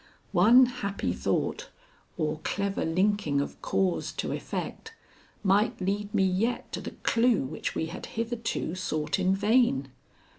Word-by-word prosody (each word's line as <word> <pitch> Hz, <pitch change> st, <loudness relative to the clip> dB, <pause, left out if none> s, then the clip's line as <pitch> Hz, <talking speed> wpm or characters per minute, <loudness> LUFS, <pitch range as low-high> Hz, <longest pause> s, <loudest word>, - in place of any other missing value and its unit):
One 225 Hz, +8 st, +7 dB
happy 240 Hz, -5 st, -3 dB
thought, -, -, -1 dB, 0.5 s
or 155 Hz, -2 st, -1 dB
clever 200 Hz, 0 st, -1 dB
linking 180 Hz, -3 st, +1 dB
of 140 Hz, -, -4 dB
cause 190 Hz, -2 st, 0 dB
to -, -, -3 dB
effect, 450 Hz, 0 st, -5 dB, 0.5 s
might 200 Hz, +2 st, +2 dB
lead 200 Hz, +2 st, -2 dB
me 195 Hz, -, +2 dB
yet 195 Hz, +6 st, 0 dB
to -, -, -4 dB
the -, -, -7 dB
clue 230 Hz, -1 st, +3 dB
which 130 Hz, -, -4 dB
we -, -, 0 dB
had 165 Hz, -, -7 dB
hitherto 230 Hz, -6 st, -3 dB
sought 155 Hz, -3 st, -2 dB
in 190 Hz, +1 st, +3 dB
vain. 210 Hz, -, +2 dB
200 Hz, 140 wpm, -28 LUFS, 180-230 Hz, 0.5 s, One